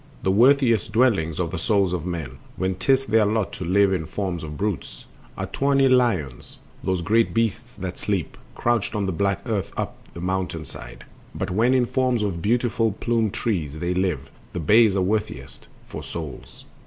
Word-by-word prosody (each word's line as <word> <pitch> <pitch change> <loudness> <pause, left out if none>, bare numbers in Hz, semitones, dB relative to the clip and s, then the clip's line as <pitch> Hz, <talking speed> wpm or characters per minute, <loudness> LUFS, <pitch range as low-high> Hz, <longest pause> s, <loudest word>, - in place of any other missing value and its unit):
The 95 - +2
worthiest 115 -1 +4
dwellings 105 -11 +2
for 90 - +1
the 85 +1 -4
souls 100 -1 +2
of 90 -1 -3
men, 75 -7 -5 0.2
When 95 +1 -1
'tis 135 +8 +2
their 110 -3 +3
lot 105 -1 0
to - - -5
live 95 +2 +3
in 80 -4 -2
forms 90 -2 -3
of 75 -1 -6
brutes, 105 -4 -3 0.3
Are - - -2
tawny 140 -1 +2
lions, 110 - +1 0.3
those 95 -2 0
great 115 +6 +2
beasts 115 +2 -1
that 95 -2 -6
sleep 100 -6 -2 0.2
Couched 120 -2 +1
on 105 -2 0
the 95 - -1
black 100 +2 0
earth 110 -5 -2
up - - -3 0.2
the - - -6
mountain 90 -3 -2
side; - - -11 0.3
But, 95 -1 -3
when 115 +7 +3
in 125 -1 +3
forms 125 -3 +1
of 90 -5 -2
beautiful 115 +1 +1
plumed 115 -1 0
trees 80 - -2
They 85 +3 -1
live, 85 -8 -1 0.2
the - - -3
bays 105 +5 +5
are 95 - +2
worthiest 95 - -3 0.2
for - - -7
souls. 80 -4 -8
100 Hz, 180 wpm, -24 LUFS, 85-115 Hz, 0.3 s, bays